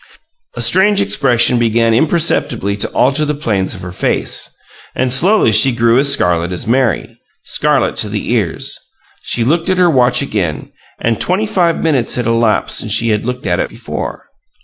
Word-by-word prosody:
A - - -4
strange 200 +2 +3
expression 125 - +2
began 115 0 +1
imperceptibly 125 - 0
to 100 - -1
alter 135 +4 +1
the 150 0 -2
planes 105 -10 -2
of - - -10
her 90 - -7
face, 90 - -1 0.5
and 130 -1 0
slowly 180 - +3
she 110 +5 +5
grew 115 +1 +2
as 140 0 +4
scarlet 85 0 +1
as 90 +6 -4
Mary 120 -3 -1 0.2
scarlet - - 0
to - - 0
the - - -4
ears. - - -2 0.4
She 120 - -1
looked 165 +8 0
at 185 - +1
her 180 -2 +3
watch 125 -1 +2
again 95 - -3 0.3
and 115 -1 -1
twenty 190 +4 0
five 180 -6 0
minutes 145 -7 0
had 125 - -2
elapsed 115 -1 +1
since 110 - -2
she 115 +1 +2
had 105 0 -1
looked 125 0 -5
at - - 0
it - - -2
before. - - -7
125 Hz, 175 wpm, -14 LUFS, 110-155 Hz, 0.5 s, she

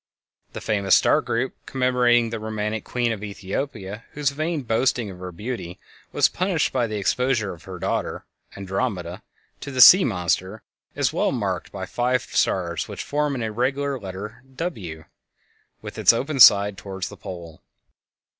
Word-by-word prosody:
This - - -7
famous 100 -3 +3
star - - +4
group 120 +3 -2
commemorating 125 -3 +2
the 115 - -3
romantic 110 0 -3
Queen 120 -1 -1
of 105 -2 -5
Ethiopia 100 +1 -5
whose 145 -2 0
vain 155 +1 -2
boasting 115 -2 0
of 90 - -12
her 90 0 -6
beauty 100 -2 -6 0.3
was - - +4
punished 180 -3 -1
by 125 -3 +1
the 110 -1 -4
exposure 115 +1 0
of 85 - -15
her 95 -1 -7
daughter - - -3 0.3
Andromeda 95 -3 -3 0.4
to - - -7
the 130 -2 -5
"Sea 185 +9 +10
Monster," 95 +1 -1 0.3
is - - 0
well - - +1
marked - - -3
by - - -5
five 125 +1 0
stars 85 -3 -1
which - - -6
form 145 -1 -1
an 120 - -3
irregular 135 +5 -1
letter 100 +2 -8
"W" 95 - -5 0.8
with - - -7
its - - +6
open 135 +4 -2
side 100 -4 +7
toward 95 -1 -7
the 105 - -4
pole. 85 -3 -9
110 Hz, 155 wpm, -23 LUFS, 95-130 Hz, 0.8 s, Sea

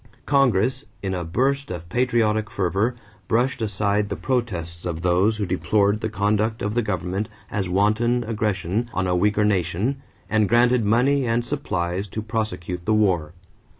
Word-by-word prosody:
Congress, 130 -1 +2 0.2
in 95 -1 -1
a 90 -1 -2
burst 135 +11 0
of 85 -2 -6
patriotic 110 -1 +1
fervor, 100 +5 0 0.3
brushed 120 +2 +1
aside 105 0 0
the - - -2
protests 90 -10 -2
of 85 -2 -3
those 90 +5 +2
who 105 - -1
deplored 100 +3 +1
the 110 - -1
conduct 105 +2 0
of 105 +1 -1
the 120 - +2
government 95 0 -2 0.2
as 95 -3 -2
wanton 110 +6 +2
aggression 105 -1 -1
on 95 - 0
a 90 -1 +1
weaker 105 +3 +2
nation 100 - 0 0.3
and 105 0 +2
granted 120 0 +4
money 125 +5 +2
and 115 +1 +1
supplies 95 -9 -2
to 110 +3 -5
prosecute 110 -6 -3
the 110 - +3
war. 90 -7 +1
105 Hz, 155 wpm, -23 LUFS, 95-120 Hz, 0.3 s, granted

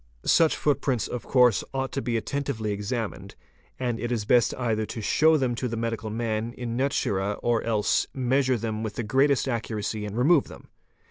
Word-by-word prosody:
Such 165 -2 +4
footprints 135 -5 0
ought - - -8
of 125 - -4
course 125 -4 +4 0.3
to 135 - -2
be 120 -3 -1
attentively 120 -3 -3
examined, 105 +2 -4 0.4
and 120 -3 -1
it 120 - -3
is 110 -4 -1
best 120 +1 +4
either 115 -3 -1
to - - -6
show 155 +8 +4
them 130 -4 0
to 125 +2 -2
the 115 -1 -4
medical 115 -1 -3
man 115 +1 -2
in 120 -2 -5
naturd 105 -7 0
or 120 -1 +2
else 110 -3 +1
measure 130 0 +1
them 110 -1 -3
with 110 -2 -4
the 120 - -3
greatest 135 +4 +2
accuracy 110 -3 -3
and 105 +2 -6
remove 145 +4 +4
them. - - -13
120 Hz, 185 wpm, -26 LUFS, 110-130 Hz, 0.4 s, Such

